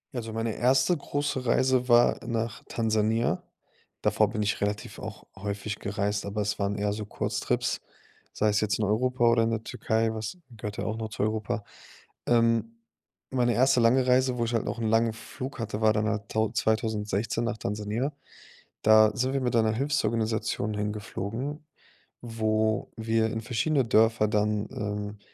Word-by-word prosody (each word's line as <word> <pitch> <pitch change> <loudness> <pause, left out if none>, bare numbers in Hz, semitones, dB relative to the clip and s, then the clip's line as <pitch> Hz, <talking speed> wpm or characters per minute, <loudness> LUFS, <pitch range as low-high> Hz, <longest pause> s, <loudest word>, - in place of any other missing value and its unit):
Ja, 120 - -1
so 115 0 -7
meine 115 0 -2
erste 130 +7 +3
große 145 -3 -2
Reise 130 +1 +2
war 120 0 +5
nach 115 -2 -2
Tansania. 110 0 +1 0.6
Davor 110 -2 +3
bin 105 -1 -2
ich 105 - -1
relativ 105 0 -3
auch - - -8
häufig 100 +1 -4
gereist, 100 0 -2
aber 105 +1 -2
es 105 0 -2
waren 100 0 0
eher 105 0 0
so 105 0 -5
Kurztrips, - - -1 0.5
sei 110 - +1
es 105 0 +2
jetzt 105 -1 +1
in 105 - 0
Europa 125 +4 +1
oder 115 0 +4
in 115 - +1
der 115 -1 -2
Türkei, 110 0 0
was 110 - -5
gehört 105 -2 -6
ja - - -3
auch 110 0 -2
noch 110 -1 -4
zu 110 - -3
Europa. 110 -1 -1 0.6
Ähm. 115 -1 +3 0.7
Meine 120 -1 +3
erste 130 +1 +4
lange 125 +3 +4
Reise, 125 0 +3
wo 120 - +1
ich 115 - -3
halt 115 - +1
noch - - -3
'n 115 - -1
langen 115 +1 +3
Flug 130 +4 -7
hatte, 110 -1 -3
war 110 - +5
dann 105 0 0
da 110 0 0
tau 110 +2 -1
2016 110 -1 0
nach 120 -1 -2
Tansania. 105 +7 -2 0.7
Da 110 0 +7
sind 130 +2 0
wir 135 - 0
mit 125 -2 0
einer 110 -1 +3
Hilfsorganisation 115 -5 0
hingeflogen, 105 +7 -4 0.6
wo 110 -2 0
wir 110 0 +1
in 110 0 -3
verschiedene 130 +5 +1
Dörfer 115 -1 +4
dann, 105 0 +1
ähm, 105 0 -4
110 Hz, 170 wpm, -27 LUFS, 105-120 Hz, 0.7 s, Da